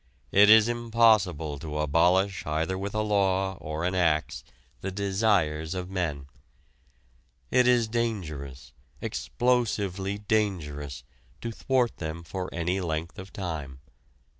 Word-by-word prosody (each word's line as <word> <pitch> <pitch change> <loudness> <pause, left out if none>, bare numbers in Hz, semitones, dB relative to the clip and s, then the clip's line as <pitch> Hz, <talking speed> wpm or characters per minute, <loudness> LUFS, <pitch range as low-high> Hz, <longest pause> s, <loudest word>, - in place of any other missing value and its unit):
It 105 +1 +6
is 110 0 +8
impossible 110 -11 +2
to 75 0 -5
abolish 90 +6 +2
either 80 +4 -1
with 100 +2 -4
a 110 - +1
law 95 -2 +1
or 80 0 -5
an 90 - 0
axe 80 -4 +1 0.4
the 95 - -4
desires 95 -5 0
of 90 0 -5
men. 75 -7 -2 1.3
It 125 0 +4
is 120 -2 +4
dangerous, 75 - -4 0.3
explosively 100 -6 -1
dangerous, 90 -10 -2 0.4
to 115 - -4
thwart 125 +1 0
them 80 0 -5
for 90 +2 -5
any 90 +3 -1
length 80 0 -3
of 95 +1 -9
time. 80 -9 -5
95 Hz, 120 wpm, -27 LUFS, 80-105 Hz, 1.3 s, is